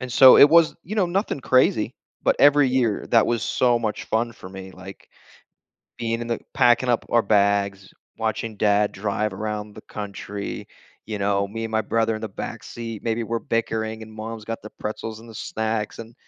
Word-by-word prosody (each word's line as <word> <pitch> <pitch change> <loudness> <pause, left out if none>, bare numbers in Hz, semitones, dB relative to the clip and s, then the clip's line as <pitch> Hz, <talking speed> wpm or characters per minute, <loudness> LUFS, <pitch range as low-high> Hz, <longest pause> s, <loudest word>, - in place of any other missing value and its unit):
and 125 -1 -6
so, 130 +2 +9
it 145 - +9
was, 165 -1 +5
you 205 - -5
know, 190 -4 +3
nothing 185 -4 -1
crazy, 130 -4 +2 0.3
but - - +3
every 145 -1 +6
year, 125 -5 0
that 115 -2 +5
was 120 -2 0
so 120 -2 +2
much 110 -3 -3
fun 115 +2 -1
for 95 - -11
me, 95 0 -9
like, 95 +1 -12 0.9
being 115 0 -2
in 120 - -5
the 115 - -1 0.2
packing 125 -1 +4
up 120 -2 +1
our 120 - +4
bags, 100 -1 +1 0.3
watching 110 0 -2
dad 105 0 +2
drive 105 +1 -2
around 105 +1 -5
the - - -10
country, 100 -1 -6 0.4
you 105 -2 -4
know? 100 0 +1
Me 115 +2 -5
and 115 - -4
my 110 - +2
brother 115 +1 0
in 110 - -5
the 110 - -3
back 100 - -7
seat, 115 -2 -7
maybe 115 0 0
we're 115 +1 -2
bickering, 110 -1 -2
and 110 0 -11
mom's 110 0 -7
got 115 +1 -5
the 105 - -9
pretzels 110 +1 -5
and 115 - -14
the 115 - -12
snacks 110 0 -3
and, 115 +1 -11
110 Hz, 200 wpm, -23 LUFS, 105-120 Hz, 0.9 s, so